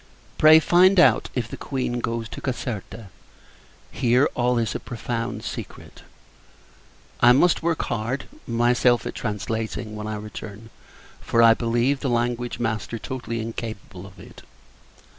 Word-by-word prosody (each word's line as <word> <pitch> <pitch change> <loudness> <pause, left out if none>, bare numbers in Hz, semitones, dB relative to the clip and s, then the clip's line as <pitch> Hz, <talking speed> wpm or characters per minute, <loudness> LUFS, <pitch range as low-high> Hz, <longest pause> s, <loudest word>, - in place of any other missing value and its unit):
Pray, 155 +1 +8
find 180 +4 +5
out 130 -10 +4
if 120 -4 -1
the - - -7
Queen 125 -3 -3
goes 115 -1 -3
to - - -9
Caserta. 115 -4 -5 0.8
Here, 125 +3 +3
all 125 0 +1
is 115 -1 0
a - - -3
profound 120 -1 -4
secret. - - -8 1.2
I 120 0 +7
must 170 +7 +3
work 165 -1 0
hard, 120 +3 -3 0.2
myself, 120 +1 +2
at - - -4
translating, 110 +1 -4
when 105 0 -6
I 110 - -3
return; 105 +1 -9 0.5
for 115 - +2
I 115 0 +8
believe 120 +4 0
the 135 - -2
language 120 0 -1
master 110 0 -3
totally 115 -1 -5
incapable 110 -4 -7
of 100 - -17
it. - - -13
120 Hz, 140 wpm, -23 LUFS, 110-125 Hz, 1.2 s, Pray